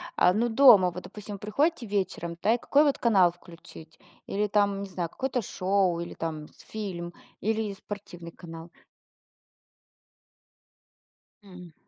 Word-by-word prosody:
А, 180 - +4
но 235 +3 +1
дома 220 -7 +7
вот, 180 +1 -8
допустим, 210 -1 -8
приходите 265 - 0
вечером, 185 -4 -3
да, 220 - +3
и - - -2
какой, 285 +5 +3
вот, 285 -2 +2
канал 190 -7 +4
включить? 170 -2 -15 0.3
Или, 210 +1 0
там, 200 -1 +1
не 195 - -7
знаю, 175 -3 -3
какое-то 260 +1 -2
шоу, 185 -3 0
или 170 - -6
там 155 -2 -5 0.2
фильм, 180 -5 -5 0.3
или 220 -1 -1
спортивный 185 -4 -9
канал? 165 -1 -11 2.7
М. 180 -4 -13
195 Hz, 130 wpm, -27 LUFS, 175-215 Hz, 2.7 s, дома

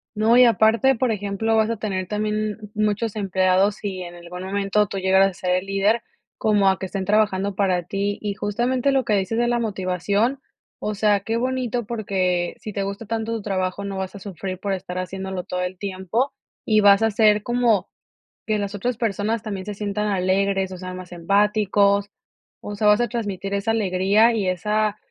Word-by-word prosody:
No, 220 +2 +3
y 250 0 +8
aparte, 230 +3 +4
por 245 0 0
ejemplo, 205 +2 -1
vas 220 0 +3
a 230 - -2
tener 190 -3 -3
también, 210 0 -3
muchos 215 +1 -1
empleados, 190 0 +1
y 190 -3 -3
en 175 -1 -8
algún 175 +1 -9
momento 200 +1 +1
tú 200 - -5
llegaras 190 +1 +4
a - - -15
ser 180 - +3
el 185 - -4
líder, 200 +4 +2 0.4
como 205 -2 +3
a 190 - 0
que - - -4
estén 190 0 -4
trabajando 200 -1 +1
para 185 -3 +1
ti, 200 +3 -2
y 205 -1 -2
justamente 245 +7 0
lo 265 -2 +1
que 215 - +1
dices 200 +3 0
de 240 - +2
la 240 0 +1
motivación, 205 +4 0 0.4
o 210 - -3
sea, 205 0 +3
qué 225 +4 -2
bonito, 250 -1 -1
porque, 185 -6 -1
si 215 - -7
te 200 - -2
gusta 200 +3 -5
tanto 225 +1 -2
tu 225 - -3
trabajo 185 -1 -2
no 200 -1 -4
vas 190 +1 -4
a - - -7
sufrir 185 -1 -6
por 200 0 -2
estar 180 -1 -5
haciéndolo 190 0 -4
todo 180 0 -4
el 180 +1 -3
tiempo, 200 +7 -2 0.3
y 215 -1 +4
vas 200 +1 +6
a 225 - +3
ser 210 -1 +4
como 240 -4 +2 0.6
que 215 -1 +1
las 200 0 -3
otras 235 +4 -2
personas 220 0 -1
también 200 -4 -5
se 210 - -4
sientan 210 +1 -2
alegres 195 0 +1
o 185 - -6
sean 185 0 -6
más 185 -1 -10
empáticos, 200 +2 +2 0.5
o 205 - -6
sea, 210 +1 +1
vas 210 +3 +5
a 240 - +1
transmitir 200 -4 -4
esa 200 +3 0
alegría 205 +2 +3
y 210 -4 -1
esa 210 +3 0
200 Hz, 200 wpm, -22 LUFS, 190-220 Hz, 0.6 s, y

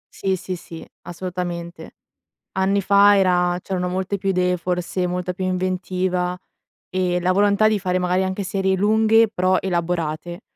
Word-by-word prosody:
Sì, 190 -1 0
sì, 185 +1 -5
sì, 170 -1 -10 0.2
assolutamente, 175 -1 -6 0.6
anni 190 +1 +1
fa 200 +1 +5
era 180 -2 +2
c'erano 180 -2 -2
molte 190 +2 -2
più 195 0 -2
idee 180 -1 +1
forse, 180 +1 -2
molta 180 0 -2
più 190 +1 -5
inventiva, 185 -1 -1 0.5
e 180 -1 0
la 180 - +2
volontà 205 +2 +3
di 215 -1 0
fare, 185 -1 -1
magari, 180 +1 +1
anche 190 +2 -3
serie 190 0 0
lunghe 220 +3 +4
però 185 -2 +1
elaborate. 175 -2 -2
185 Hz, 150 wpm, -21 LUFS, 180-190 Hz, 0.6 s, fa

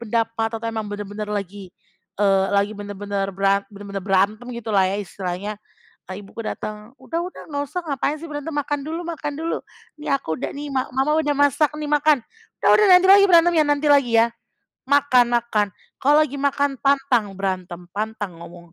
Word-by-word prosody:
pendapat 225 0 -1
atau 230 - -4
emang 220 -1 -3
benar-benar 205 +1 -5
lagi, 200 -1 -5 0.5
eee, 195 -1 +3
lagi 200 +1 +2
benar-benar 205 -1 -4
beran 195 0 +2
benar-benar 200 -1 -7
berantem 200 +4 +1
gitulah 210 -4 +1
ya 195 - -2
istilahnya. 195 +1 -5 0.5
Eee, 185 - -6
ibu 195 - -15
ku 230 - -4
datang, 215 +3 -6
"Udah 335 0 -3
udah 365 - -9
enggak 285 -1 -2
usah, 360 +4 -2
ngapain 285 0 -1
sih 335 - -8
berantem. 295 +2 -5
Makan 290 0 -1
dulu 320 +3 -4
makan 305 -3 -4
dulu. 330 - -2 0.4
Nih 300 - -4
aku 160 -13 -1
udah - - -3
nih 290 +1 -6
ma 260 - +1
mama 270 +4 +1
udah 295 -2 0
masak 285 +1 +3
nih, 300 - -4
makan. 295 -1 +4 0.4
Udah - - +4
udah 425 - +4
nanti 365 +1 +7
lagi 400 0 +8
berantemnya, 340 -3 +5
nanti 290 +1 +1
lagi 245 -5 +4
ya. 230 - +4 0.6
Makan 255 -4 +4
makan, 225 -3 +1 0.3
kalau 285 +2 +4
lagi 285 -1 -6
makan 280 0 0
pantang 270 -7 +2
berantem, 185 -2 -4
pantang 210 -4 -4
ngomong, 170 0 -12
230 Hz, 180 wpm, -22 LUFS, 200-285 Hz, 0.6 s, lagi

